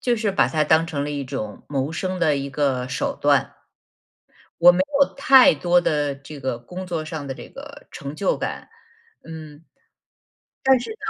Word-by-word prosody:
就 245 Hz, -1 st, +1 dB
是 215 Hz, -2 st, 0 dB
把 195 Hz, -, +2 dB
它 155 Hz, -1 st, +1 dB
当 160 Hz, +2 st, +3 dB
成 145 Hz, -3 st, -3 dB
了 150 Hz, -, -4 dB
一 140 Hz, -2 st, -4 dB
种 110 Hz, -6 st, -6 dB
谋 140 Hz, +1 st, -2 dB
生 185 Hz, +3 st, -3 dB
的 155 Hz, -4 st, +2 dB
一 140 Hz, 0 st, -4 dB
个 135 Hz, -3 st, -1 dB
手 130 Hz, -, -2 dB
段。 -, -, +2 dB, 1.0 s
我 175 Hz, +1 st, +8 dB
没 175 Hz, -, -2 dB, 0.2 s
有 280 Hz, -, +3 dB
太 270 Hz, -2 st, +6 dB
多 175 Hz, +4 st, +2 dB
的 145 Hz, -4 st, 0 dB
这 140 Hz, +2 st, -11 dB
个 130 Hz, -3 st, -3 dB
工 180 Hz, +10 st, -9 dB
作 165 Hz, -3 st, -3 dB
上 155 Hz, -2 st, -6 dB
的 135 Hz, -, -4 dB
这 -, -, -11 dB
个 285 Hz, +1 st, -12 dB
成 140 Hz, +1 st, -7 dB
就 195 Hz, -, 0 dB
感， -, -, -5 dB, 0.5 s
嗯， 155 Hz, -2 st, -11 dB, 1.0 s
但 265 Hz, -1 st, +5 dB
是 245 Hz, -, -7 dB
呢 440 Hz, -, -7 dB
155 Hz, 200 characters per minute, -22 LUFS, 140-180 Hz, 1.0 s, 我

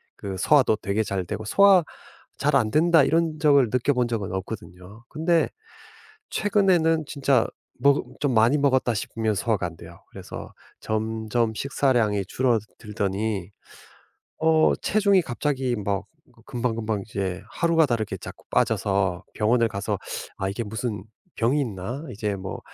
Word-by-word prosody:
그 95 Hz, -2 st, -6 dB
소화도 135 Hz, -2 st, +4 dB
되게 105 Hz, +1 st, -1 dB
잘 100 Hz, -3 st, -2 dB
되고 110 Hz, +5 st, -5 dB
'소화 195 Hz, -, +6 dB, 0.5 s
잘 145 Hz, +1 st, +1 dB
안 110 Hz, -5 st, +2 dB
된다.' 165 Hz, +1 st, +5 dB
이런 165 Hz, +1 st, +1 dB
적을 140 Hz, -5 st, +4 dB
느껴본 125 Hz, 0 st, +1 dB
적은 110 Hz, -5 st, -3 dB
없거든요. 95 Hz, +1 st, -7 dB
근데 165 Hz, +1 st, +1 dB, 0.8 s
최근에는 180 Hz, -6 st, +2 dB
진짜 135 Hz, -4 st, +2 dB, 0.3 s
먹 140 Hz, +2 st, +4 dB, 0.2 s
좀 145 Hz, -2 st, +1 dB
많이 115 Hz, +5 st, +4 dB
먹었다 130 Hz, -4 st, +2 dB
싶으면 110 Hz, +1 st, -2 dB
소화가 105 Hz, -1 st, 0 dB
안 85 Hz, -2 st, -8 dB
돼요. -, -, -13 dB
그래서 -, -, -9 dB, 0.3 s
점점 110 Hz, +1 st, -1 dB
식사량이 120 Hz, -6 st, +1 dB
줄어들더니 105 Hz, -3 st, -2 dB, 0.9 s
어 160 Hz, 0 st, +4 dB
체중이 200 Hz, -2 st, +3 dB
갑자기 130 Hz, -2 st, -1 dB
막 100 Hz, -2 st, -2 dB, 0.4 s
금방금방 115 Hz, -4 st, -2 dB
이제 95 Hz, -3 st, -3 dB
하루가 165 Hz, -1 st, +2 dB
다르게 115 Hz, -5 st, -2 dB
자꾸 -, -, -11 dB
빠져서 95 Hz, -2 st, +1 dB
병원을 115 Hz, +2 st, +2 dB
가서 100 Hz, -1 st, -3 dB, 0.4 s
'아 95 Hz, -, -1 dB
이게 100 Hz, +4 st, -3 dB
무슨 110 Hz, -1 st, -4 dB, 0.3 s
병이 125 Hz, +6 st, +2 dB
있나? 120 Hz, -, -4 dB
이제 105 Hz, -2 st, -3 dB
뭐 95 Hz, 0 st, -6 dB
115 Hz, 285 characters per minute, -24 LUFS, 105-140 Hz, 0.9 s, 소화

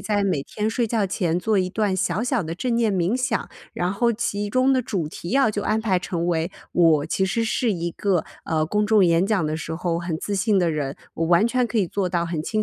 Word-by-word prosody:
在 205 Hz, -2 st, 0 dB
每 180 Hz, -8 st, 0 dB
天 215 Hz, +1 st, -2 dB
睡 235 Hz, 0 st, 0 dB
觉 220 Hz, -2 st, 0 dB
前 180 Hz, -3 st, -1 dB
做 215 Hz, +1 st, +1 dB
一 185 Hz, -1 st, +1 dB
段 205 Hz, -1 st, 0 dB
小 190 Hz, +2 st, 0 dB
小 250 Hz, -1 st, 0 dB
的 165 Hz, -3 st, -4 dB
正 235 Hz, +7 st, -1 dB
念 225 Hz, -4 st, +2 dB
冥 185 Hz, +6 st, +1 dB
想， 255 Hz, -, -1 dB, 0.2 s
然 180 Hz, +2 st, -1 dB
后 235 Hz, +3 st, +2 dB
其 205 Hz, -2 st, -2 dB
中 255 Hz, +4 st, +3 dB
的 260 Hz, -, +3 dB
主 180 Hz, -9 st, -3 dB
题 170 Hz, -, -8 dB
要 270 Hz, -3 st, +3 dB
就 205 Hz, -1 st, -3 dB
安 220 Hz, +1 st, 0 dB
排 195 Hz, -5 st, +1 dB
成 175 Hz, -1 st, -3 dB
为 170 Hz, +1 st, 0 dB, 0.2 s
我 160 Hz, -3 st, +3 dB
其 190 Hz, +4 st, 0 dB
实 220 Hz, +4 st, 0 dB
是 225 Hz, 0 st, 0 dB
一 170 Hz, -1 st, -3 dB
个， 185 Hz, -1 st, 0 dB, 0.2 s
呃， 155 Hz, -1 st, 0 dB
公 210 Hz, +6 st, 0 dB
众 215 Hz, -3 st, +5 dB
演 170 Hz, +1 st, +3 dB
讲 200 Hz, -6 st, +1 dB
的 155 Hz, +1 st, -1 dB
时 160 Hz, 0 st, -5 dB
候 170 Hz, 0 st, -1 dB
很 175 Hz, -2 st, -3 dB
自 200 Hz, +4 st, -3 dB
信 205 Hz, +1 st, +2 dB
的 175 Hz, -3 st, +2 dB
人， 145 Hz, -3 st, -3 dB, 0.2 s
我 165 Hz, -, -1 dB
完 175 Hz, +5 st, +4 dB
全 250 Hz, +1 st, +1 dB
可 235 Hz, -, -1 dB
以 190 Hz, -4 st, +1 dB
做 190 Hz, +1 st, -1 dB
到 170 Hz, -1 st, 0 dB
很 170 Hz, -2 st, -3 dB
清 215 Hz, +7 st, -1 dB
190 Hz, 270 characters per minute, -23 LUFS, 170-220 Hz, 0.2 s, 众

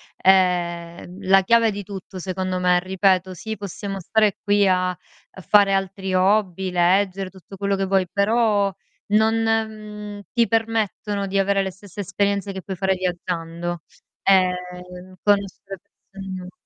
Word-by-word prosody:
è, 175 Hz, -2 st, +2 dB
mhmm, 185 Hz, +2 st, -10 dB
la 195 Hz, 0 st, +6 dB
chiave 230 Hz, +3 st, +4 dB
di 205 Hz, 0 st, -5 dB
tutto, 195 Hz, -1 st, -9 dB
secondo 185 Hz, 0 st, -3 dB
me. 180 Hz, 0 st, +3 dB
Ripeto, 185 Hz, 0 st, +1 dB
sì 220 Hz, +4 st, -6 dB
possiamo 200 Hz, 0 st, -6 dB
stare 210 Hz, +2 st, +1 dB
qui 205 Hz, -1 st, +3 dB
a 185 Hz, 0 st, +2 dB
a 180 Hz, +1 st, -16 dB
fare 200 Hz, +1 st, +4 dB
altri 195 Hz, 0 st, -2 dB
hobby, 190 Hz, -1 st, +2 dB
leggere, 185 Hz, +2 st, +2 dB
tutto 190 Hz, +1 st, -13 dB
quello 200 Hz, +1 st, 0 dB
che 195 Hz, -, -1 dB
vuoi, 190 Hz, -1 st, +1 dB
però 205 Hz, -1 st, +2 dB, 0.3 s
non, 220 Hz, +2 st, +3 dB
mhmm, 215 Hz, -2 st, -3 dB
ti 235 Hz, -2 st, +2 dB
permettono 215 Hz, -2 st, -1 dB
di 195 Hz, +1 st, -1 dB
avere 195 Hz, 0 st, +2 dB
le 190 Hz, 0 st, -2 dB
stesse 195 Hz, +1 st, -14 dB
esperienze 200 Hz, +1 st, -1 dB
che 190 Hz, -, -6 dB
puoi 190 Hz, 0 st, -6 dB
fare 190 Hz, 0 st, +1 dB
viaggiando, 175 Hz, -2 st, -3 dB, 0.4 s
ehm, 180 Hz, -1 st, 0 dB
conoscere 200 Hz, -1 st, 0 dB
persone 195 Hz, -1 st, -12 dB
nuove 185 Hz, -1 st, -7 dB
195 Hz, 150 wpm, -22 LUFS, 185-205 Hz, 0.4 s, la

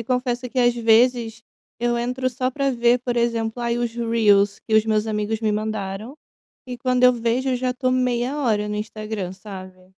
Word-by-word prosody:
e -, -, -6 dB
confesso 250 Hz, 0 st, -1 dB
que 260 Hz, -, -3 dB
às 240 Hz, -1 st, +4 dB
vezes, 230 Hz, 0 st, +2 dB, 0.4 s
eu 240 Hz, 0 st, 0 dB
entro 250 Hz, +2 st, -1 dB
só 255 Hz, +1 st, -2 dB
pra 275 Hz, +1 st, 0 dB
ver 240 Hz, 0 st, +3 dB
por 245 Hz, -1 st, -3 dB
exemplo, 230 Hz, 0 st, -1 dB
aí 235 Hz, 0 st, 0 dB
os 240 Hz, -1 st, -2 dB
reels 215 Hz, -4 st, +2 dB
que 220 Hz, -, -3 dB
os 220 Hz, 0 st, +5 dB
meus 215 Hz, 0 st, +1 dB
amigos 215 Hz, 0 st, -2 dB
me 215 Hz, -2 st, +1 dB
mandaram, 215 Hz, +3 st, -4 dB, 0.5 s
e 250 Hz, -1 st, -6 dB
quando 250 Hz, 0 st, +1 dB
eu 250 Hz, -, +7 dB
vejo, 240 Hz, +2 st, -1 dB
eu 255 Hz, -, +1 dB
já 255 Hz, 0 st, -1 dB
estou 255 Hz, 0 st, -1 dB
meia 250 Hz, +1 st, 0 dB
hora 215 Hz, -7 st, 0 dB
no 210 Hz, -, -3 dB
Instagram, 215 Hz, -3 st, -5 dB
sabe? 185 Hz, -1 st, -11 dB
235 Hz, 200 wpm, -22 LUFS, 215-250 Hz, 0.5 s, eu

